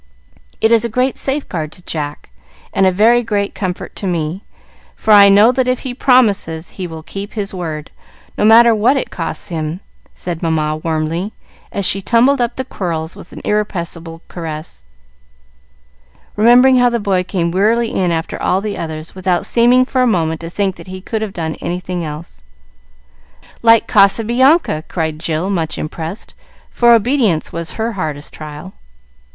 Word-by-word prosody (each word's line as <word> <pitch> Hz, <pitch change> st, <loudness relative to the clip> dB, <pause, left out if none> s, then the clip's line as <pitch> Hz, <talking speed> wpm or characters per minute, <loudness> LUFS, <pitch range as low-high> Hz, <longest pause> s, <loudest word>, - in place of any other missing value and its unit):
It 220 Hz, -, +3 dB
is 230 Hz, -1 st, +5 dB
a 235 Hz, -, -1 dB
great 250 Hz, +4 st, 0 dB
safeguard 190 Hz, -, -3 dB
to 180 Hz, -, -17 dB
Jack, 145 Hz, -, -5 dB, 0.4 s
and 190 Hz, -, +3 dB
a -, -, +4 dB
very 225 Hz, +6 st, +4 dB
great 205 Hz, -3 st, -2 dB
comfort 185 Hz, -3 st, -5 dB
to 195 Hz, -, -4 dB
me; 170 Hz, +1 st, -2 dB, 0.5 s
for 220 Hz, -, -1 dB
I 200 Hz, -1 st, +8 dB
know 205 Hz, +4 st, +6 dB
that 255 Hz, 0 st, 0 dB
if 255 Hz, 0 st, 0 dB
he 260 Hz, -2 st, -4 dB
promises 210 Hz, -11 st, +2 dB
he 185 Hz, -2 st, -6 dB
will 160 Hz, -1 st, -9 dB
keep 200 Hz, +5 st, -7 dB
his 205 Hz, -3 st, -3 dB
word, 160 Hz, -4 st, -5 dB, 0.4 s
no -, -, -1 dB
matter 230 Hz, +2 st, +7 dB
what 235 Hz, +6 st, +2 dB
it -, -, -3 dB
costs 165 Hz, -, -4 dB
him," 160 Hz, 0 st, -3 dB, 0.4 s
said 175 Hz, -2 st, -4 dB
Mamma 155 Hz, -2 st, 0 dB
warmly, 165 Hz, +5 st, -2 dB, 0.4 s
as 200 Hz, -, -1 dB
she 195 Hz, +2 st, +2 dB
tumbled 245 Hz, +6 st, +3 dB
up 240 Hz, 0 st, -1 dB
the 260 Hz, -, -4 dB
quirls 165 Hz, -8 st, -4 dB
with -, -, -13 dB
an -, -, -10 dB
irrepressible 170 Hz, -5 st, -3 dB
caress, 155 Hz, -, -7 dB, 1.5 s
remembering 245 Hz, +4 st, +6 dB
how 245 Hz, 0 st, +4 dB
the 235 Hz, 0 st, -1 dB
boy 195 Hz, -3 st, 0 dB
came 175 Hz, -2 st, -2 dB
wearily 225 Hz, +5 st, +1 dB
in 180 Hz, -2 st, +1 dB
after 165 Hz, 0 st, -3 dB
all 185 Hz, -, +1 dB
the 205 Hz, 0 st, -4 dB
others, 160 Hz, -1 st, -6 dB
without 185 Hz, -2 st, 0 dB
seeming 245 Hz, +2 st, +4 dB
for 255 Hz, 0 st, 0 dB
a 250 Hz, -, +3 dB
moment 160 Hz, -7 st, 0 dB
to 165 Hz, -, -6 dB
think 190 Hz, +1 st, -1 dB
that -, -, -12 dB
he 185 Hz, 0 st, -7 dB
could 220 Hz, +3 st, -4 dB
have 215 Hz, -2 st, -3 dB
done 160 Hz, -4 st, -4 dB
anything 180 Hz, 0 st, -4 dB
else. 155 Hz, +1 st, -8 dB, 1.2 s
"Like 230 Hz, -1 st, +5 dB
Casabianca!" 235 Hz, -, +3 dB
cried 160 Hz, -3 st, -3 dB
Jill, 165 Hz, +3 st, -2 dB
much 165 Hz, -5 st, -2 dB
impressed, 160 Hz, +5 st, -6 dB, 0.4 s
for 240 Hz, -1 st, +4 dB
obedience 225 Hz, -, +1 dB
was 170 Hz, 0 st, -4 dB
her 225 Hz, +1 st, -2 dB
hardest 155 Hz, -8 st, -5 dB
trial. 155 Hz, +4 st, -9 dB
190 Hz, 170 wpm, -16 LUFS, 165-230 Hz, 1.5 s, I